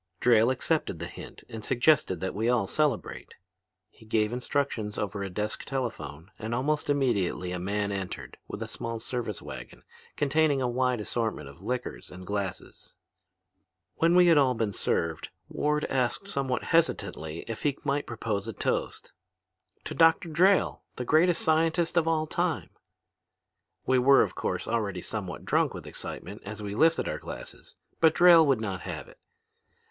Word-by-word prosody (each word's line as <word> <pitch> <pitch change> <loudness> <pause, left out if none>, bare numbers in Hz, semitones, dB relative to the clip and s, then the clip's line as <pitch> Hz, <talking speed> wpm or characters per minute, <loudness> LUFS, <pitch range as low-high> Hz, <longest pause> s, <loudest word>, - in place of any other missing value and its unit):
"Drayle 115 -1 +5
accepted 140 - -1
the 85 - -5
hint 85 - -10
and 110 -1 -8
suggested 120 - +2
that 95 - -2
we 110 +4 0
all 120 -5 +2
celebrate. 145 +1 -1 0.6
He - - -19
gave 110 0 0
instructions 125 -4 -2
over 105 -1 -3
a 100 - -3
desk 105 +3 -3
telephone 95 - -5
and 110 +2 -3
almost 145 +5 0
immediately 110 -10 +1
a 90 - -3
man 100 +2 -1
entered 95 -2 -5
with - - -5
a - - -6
small 115 0 -5
service 115 -2 -4
wagon - - -9 0.3
containing 145 0 +2
a 130 - 0
wide 125 0 +1
assortment 110 - -2
of 70 +5 -13
liquors 105 - -4
and 90 0 -10
glasses. 100 -2 -5 1.0
When 165 +1 +4
we 180 0 +7
had 165 -3 +6
all 130 -3 +3
been 110 -3 -1
served, 80 -4 -1 0.2
Ward 150 0 0
asked 130 +9 -1
somewhat 135 -8 -1
hesitantly 85 - 0
if 115 -2 -5
he 145 -2 0
might 145 0 -1
propose 110 -3 -3
a 115 - -4
toast. - - -2 0.7
'To - - -5
Dr. 165 +1 +4
Drayle, 185 +5 +3
the 125 - -4
greatest 165 +5 +3
scientist 165 +2 +2
of 170 -2 +3
all 160 -1 +2
time!' - - -1 1.1
"We 130 0 +3
were 135 +2 +6
of - - -3
course, - - -3
already 105 -6 -1
somewhat 95 -6 -5
drunk - - +1
with - - -8
excitement - - -7
as 105 +1 -7
we 100 -1 -4
lifted 160 +9 +3
our - - -3
glasses. - - -9 0.2
But 160 -1 +5
Drayle 170 -3 +8
would 135 -5 +3
not 95 -4 -3
have - - -6
it. - - -17
120 Hz, 165 wpm, -28 LUFS, 100-150 Hz, 1.1 s, Drayle